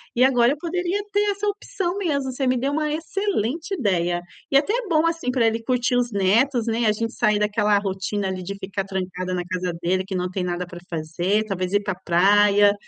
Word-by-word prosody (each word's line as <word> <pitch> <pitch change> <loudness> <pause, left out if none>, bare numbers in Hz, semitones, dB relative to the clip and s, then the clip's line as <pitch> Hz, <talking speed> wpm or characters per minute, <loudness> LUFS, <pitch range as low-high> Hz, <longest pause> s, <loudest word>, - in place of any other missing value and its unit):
e 245 - +4
agora 245 -2 +4
eu - - -8
poderia 355 +4 -2
ter 410 - +2
essa 405 +1 -4
opção 395 -3 -2
mesmo, 285 -9 -1
você 265 +1 -2
me 255 - +3
deu 270 +3 -1
uma 305 0 0
excelente 325 - -2
ideia. 175 - 0 0.3
E - - +1
até 290 +9 +2
é 485 -2 -1
bom 315 0 +3
assim 330 -5 -1
pra 250 -2 +2
ele 225 0 +1
curtir 245 0 +1
os 245 -1 0
netos, 225 +6 +2
né, 230 0 0
a - - +5
gente 230 +2 -3
sair 210 0 +2
daquela 210 0 +2
rotina 195 0 -2
ali 185 -1 -4
de 195 +2 -5
ficar 195 0 -4
trancada 185 -1 -4
na 180 -1 -1
casa 180 0 -3
dele 185 +2 +1
que 190 0 -5
não 180 0 -1
tem 185 -1 -2
nada 175 0 -2
para 175 0 -10
fazer, 175 +6 -1
talvez 185 -2 -3
ir 205 - +3
para 190 -2 -2
praia. 205 +3 +5
210 Hz, 220 wpm, -23 LUFS, 190-280 Hz, 0.3 s, a